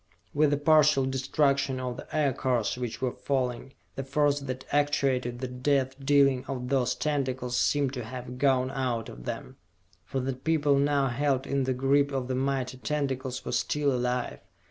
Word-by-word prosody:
With 150 0 +3
the 145 - +1
partial 150 -2 +4
destruction 135 0 +1
of 125 -1 -3
the - - -9
Aircars 130 -6 +1
which 125 0 -5
were 125 - +1
falling, 130 -1 -2 0.2
the 135 - -4
force 145 +1 +1
that 130 -2 -6
actuated 135 -4 +1
the 130 +1 -4
death 130 +1 0
dealing 135 -2 +4
of 125 -2 -4
those 125 -2 +1
tentacles 130 -4 -1
seemed 140 0 +1
to 125 -3 -4
have 125 +1 -7
gone 130 -2 +2
out 125 -4 -2
of - - -11
them. - - -6 0.5
For 135 - -3
the 130 +1 -2
people 145 +1 +1
now 140 -1 +2
held 135 +1 0
in 140 -1 0
the 130 0 0
grip 140 +2 +2
of 130 -2 -2
the - - 0
mighty 130 -1 -1
tentacles 130 -3 -2
were - - -3
still 140 +4 +1
alive! 125 -1 -1
135 Hz, 170 wpm, -28 LUFS, 125-140 Hz, 0.5 s, partial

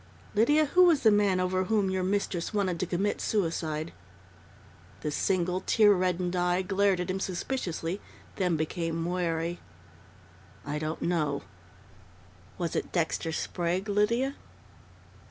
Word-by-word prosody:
"Lydia, 295 +9 +4
who 360 +5 +5
was 330 -5 +4
the 220 - +6
man 205 -3 +3
over 185 0 0
whom 205 -2 +1
your 190 0 0
mistress 185 -2 -1
wanted 185 -4 0
to 185 - -1
commit 195 +4 -1
suicide?" 165 -5 -1 1.1
The 150 - -2
single, 180 +3 0
tear 210 -2 +6
reddened 180 -1 0
eye 180 +1 +1
glared 195 0 +2
at 180 +1 -2
him 190 - -2
suspiciously, 185 -2 -3 0.4
then 180 -4 +1
became 165 +1 -2
wary. 170 -1 -1 1.1
"I 150 +1 -3
don't 155 +1 -3
know." 150 -5 0 1.1
"Was 170 -3 -2
it - - -2
Dexter 165 -1 -1
Sprague, 175 +4 -2
Lydia?" 230 +6 +1
185 Hz, 130 wpm, -28 LUFS, 170-200 Hz, 1.1 s, the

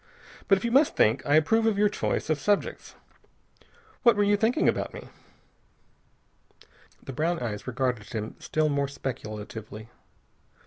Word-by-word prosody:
But 195 - +5
if 190 - -5
you 235 - 0
must 280 +4 +4
think, 110 +5 +3
I 145 - +4
approve 225 +9 +3
of 215 -3 +1
your 210 +1 +4
choice 200 - -2
of 155 - 0
subjects. 205 +5 -1 1.1
What 235 - +5
were 205 - +2
you 205 0 +3
thinking 230 +9 +1
about - - -1
me?" - - -10 1.9
The 135 - -7
brown 165 +5 0
eyes 110 -6 -5
regarded 125 -3 -2
him 110 -1 -5
still 155 0 0
more 140 -1 0
speculatively. 110 -4 -7
150 Hz, 145 wpm, -27 LUFS, -, 1.9 s, But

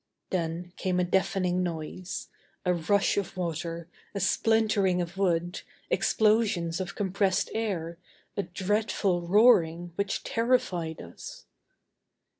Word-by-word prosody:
Then 175 0 -2
came 185 -1 0
a - - +3
deafening 185 0 +1
noise. 175 +1 -4 0.4
A 180 - +3
rush 195 +5 +2
of 195 -1 -2
water, 170 -1 -3 0.3
a - - -1
splintering 205 -1 +2
of 175 0 -3
wood, 175 -2 0 0.3
explosions 210 -6 +2
of 185 - -5
compressed 195 -1 +1
air, 175 -7 -2 0.4
a 200 - +1
dreadful 190 0 0
roaring 175 -3 +4
which 200 0 -1
terrified 195 -9 0
us. 85 - -10
180 Hz, 110 wpm, -28 LUFS, 170-200 Hz, 0.4 s, roaring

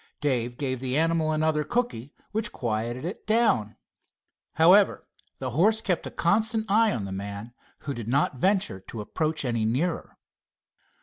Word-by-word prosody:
Dave 120 -4 -1
gave 130 -3 -2
the 130 +1 -1
animal 165 -1 +2
another 155 0 +1
cookie, 235 - -2 0.2
which 215 0 -2
quieted 120 +3 -3
it 180 - -6
down. 215 - +2 0.8
However, 185 +5 +5 0.3
the 130 -1 -4
horse 205 - +3
kept 180 -6 -1
a - - -4
constant 220 +5 +1
eye 220 +1 +4
on 105 - -3
the 95 - -6
man, 100 +4 -6 0.3
who 140 - -4
did 115 -4 -6
not 135 +3 +1
venture 185 - +1
to 105 +3 -8
approach 155 +7 -2
any 115 -3 0
nearer. 135 +11 -1
150 Hz, 150 wpm, -26 LUFS, 120-190 Hz, 0.8 s, However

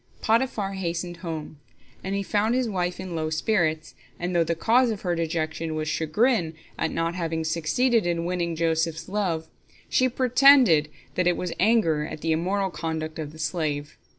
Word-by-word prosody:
Potiphar 220 -4 +1
hastened 175 -2 -3
home, 160 -3 -6 0.4
and 195 +1 -2
he 200 - -1
found 215 +4 +1
his 255 -1 +1
wife 180 -4 -2
in 185 -2 -6
low 155 -1 -1
spirits, 160 -1 0 0.3
and 175 +1 -2
though 170 - +4
the 170 +1 -1
cause 240 +8 +3
of 215 -3 -3
her 175 -2 -1
dejection 160 -1 -2
was 155 0 -2
chagrin 165 - +1 0.2
at 160 - -1
not 165 0 -1
having 165 -2 -2
succeeded 175 +8 +1
in 170 -1 -1
winning 175 -1 -1
Joseph's 160 0 0
love, 185 -5 -1 0.4
she 255 0 +3
pretended 250 - +5 0.2
that 180 -1 +1
it 175 - +2
was 180 -2 -3
anger 185 -8 +3
at 150 0 -7
the 165 - 0
immoral 190 +4 0
conduct 160 -1 -4
of 150 -2 -5
the 160 - -13
slave. 155 -3 -2
170 Hz, 175 wpm, -25 LUFS, 160-200 Hz, 0.4 s, pretended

